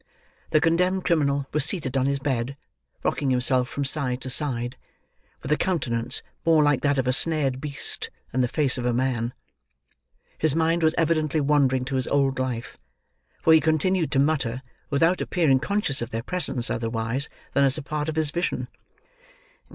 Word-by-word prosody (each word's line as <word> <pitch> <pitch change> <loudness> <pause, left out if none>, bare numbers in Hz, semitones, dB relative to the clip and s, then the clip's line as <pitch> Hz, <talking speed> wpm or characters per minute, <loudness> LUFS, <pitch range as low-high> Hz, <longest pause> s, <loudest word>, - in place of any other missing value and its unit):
The 155 - +3
condemned 180 +4 +1
criminal 140 -4 +1
was 150 -2 +2
seated 150 -5 0
on 135 0 +2
his 140 0 0
bed, 135 -1 -2 0.5
rocking 140 -2 0
himself 125 0 +2
from 140 -2 -3
side 135 -3 +2
to 130 - -3
side, 120 -4 0 0.7
with - - -5
a 150 - +3
countenance 125 -9 -1 0.2
more 160 -2 +4
like 145 -2 +2
that 145 -1 +1
of 130 - +1
a 125 - +2
snared 135 -3 +1
beast 145 -2 -3 0.2
than 130 - 0
the 125 - +2
face 135 0 0
of 120 - -3
a 120 - +1
man. 120 -1 -1 1.1
His 155 -2 +2
mind 165 +1 +1
was 160 0 +2
evidently 155 -1 +1
wandering 140 -3 +2
to 135 0 -2
his 130 - -1
old 135 -2 +1
life, 125 -3 -4 0.7
for 160 - +6
he 160 - +6
continued 160 +3 +1
to - - +1
mutter, 135 -4 0 0.3
without 165 +6 +2
appearing 150 -7 +2
conscious 200 -7 -1
of 120 - -4
their 115 -1 -4
presence 140 -7 +1
otherwise 115 +4 -2 0.2
than 140 - +3
as 135 +1 +2
a 155 - -5
part 150 +1 -3
of 155 - -4
his 155 -2 0
vision. 175 +2 -2
140 Hz, 175 wpm, -24 LUFS, 130-155 Hz, 1.1 s, for